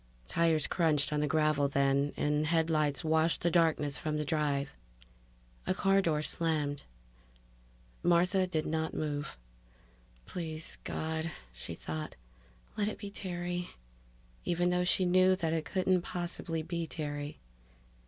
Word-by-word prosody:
Tires 160 - +2
crunched 155 -4 +2
on 150 - +1
the 150 - +1
gravel 150 -1 +3
then, 140 +1 +2
and 150 +1 +1
headlights 155 -4 +2
washed 160 +1 +2
the 170 - +2
darkness 160 -4 +2
from 155 -1 -1
the 150 - -1
drive. 145 -2 0 0.9
A 185 - +1
car 195 0 +4
door 155 -4 +1
slammed. 150 -4 0 1.2
Martha 180 +2 +3
did 160 -4 -1
not 160 0 -1
move. 145 - -3 0.9
Please 160 -3 -6
God, 160 +1 -2 0.2
she - - -6
thought, 80 -1 -5 0.6
let 205 -1 0
it 215 - -3
be 200 -1 -7
Terry, 175 -2 -3 0.7
even 175 +1 +1
though 180 0 +2
she 185 +1 +2
knew 185 +1 +5
that 165 -4 -1
it 160 -1 -1
couldn't 185 -1 +2
possibly 170 -2 -3
be 170 0 -3
Terry. 145 -2 -4
160 Hz, 135 wpm, -32 LUFS, 150-175 Hz, 1.2 s, knew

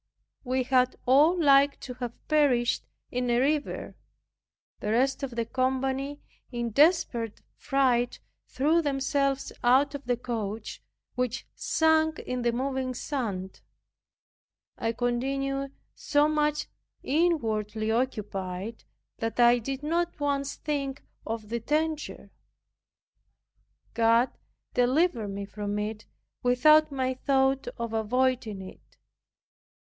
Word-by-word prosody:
We 255 0 0
had 255 0 +2
all 300 +8 +5
liked 280 -2 +5
to 250 - -6
have 245 -1 -7
perished 280 -6 +2 0.2
in 250 0 -1
a 240 - +3
river. 290 +4 -1 0.8
The 210 - -3
rest 260 +5 +2
of 260 -4 -4
the 230 -1 -1
company 265 +3 -1 0.3
in 240 -2 -3
desperate 270 - +2
fright 250 -3 +1 0.3
threw 310 +5 +2
themselves 275 -1 0
out 265 +4 +4
of 285 0 -7
the 245 -1 +1
coach, 220 -3 -4 0.3
which 250 -1 -2
sunk 315 -1 +2
in 250 0 -4
the 240 0 +2
moving 260 +1 -2
sand. 210 -10 -4 1.1
I 225 - -1
continued 275 +3 -1 0.2
so 290 0 +2
much 300 -1 +1 0.4
inwardly 220 -9 0
occupied, 210 -4 -3 0.4
that 225 +1 -3
I 240 0 +6
did 270 +4 -5
not 340 +2 -1
once 280 -1 -1
think 280 -2 -3 0.2
of 220 -2 -4
the 235 +1 -2
danger. 305 +5 -2 1.6
God 230 +2 +3 0.4
delivered 250 - +2
me 200 0 -5
from 205 0 -4
it 215 +1 -4 0.3
without 305 +5 +5
my 260 -1 -1
thought 270 0 +1
of 235 -1 -4
avoiding 225 -2 0
it. 185 - -14
255 Hz, 110 wpm, -28 LUFS, 230-280 Hz, 1.6 s, I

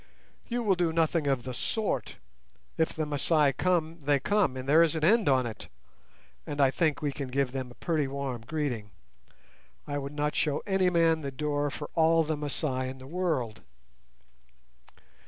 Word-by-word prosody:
"You 240 0 -2
will 205 -3 +3
do 175 -3 +1
nothing 160 -1 +1
of 135 -3 +1
the 130 - -5
sort. 140 - -2 0.6
If 160 - +1
the 155 - -1
Masai 150 0 +2
come, 170 0 0
they 145 0 +2
come, 190 -4 +1
and 130 +1 -6
there 155 +4 +6
is 165 -1 +3
an 160 - -2
end 210 +1 +4
on 130 -2 +3
it; 110 -4 -7 0.8
and 145 - -5
I 135 -2 +5
think 155 -1 0
we 145 - 0
can 140 -1 -5
give 130 0 0
them 130 -1 -4
a 120 - -14
pretty 155 -5 0
warm 135 -3 -4
greeting. 125 -5 -3 1.0
I 145 0 -3
would 140 +1 -6
not 150 0 -1
show 150 -1 0
any 190 -2 +2
man 165 -2 +3
the 140 - -3
door 145 +1 -1
for 145 +1 -6
all 165 0 +4
the 155 0 -1
Masai 140 -3 -2
in 130 - -8
the 130 - -12
world." 145 -9 -2
150 Hz, 180 wpm, -29 LUFS, 135-165 Hz, 1.0 s, there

